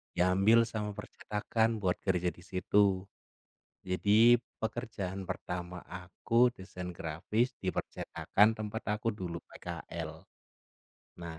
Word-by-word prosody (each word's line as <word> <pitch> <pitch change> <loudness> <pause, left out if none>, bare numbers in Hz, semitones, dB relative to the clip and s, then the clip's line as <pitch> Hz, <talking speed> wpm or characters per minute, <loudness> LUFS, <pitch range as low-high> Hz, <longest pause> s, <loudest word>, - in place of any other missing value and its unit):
diambil 95 +6 +5
sama 105 -3 -4
percetakan 110 +2 -1
buat 90 -1 +1
kerja 90 -2 +1
di 85 +1 -16
situ. 95 +1 +2 0.8
Jadi, 105 +6 +5 0.2
pekerjaan 100 -5 -3
pertama 90 0 -4
aku 95 +7 +1
desain 90 -2 -7
grafis 90 +10 -1
di 95 - 0
percetakan 110 +2 +1
tempat 110 +1 -4
aku 115 +2 0
dulu 90 -4 -5
PKL. - - -7 1.0
Nah, 80 -1 -6
95 Hz, 105 wpm, -32 LUFS, 90-110 Hz, 1.0 s, diambil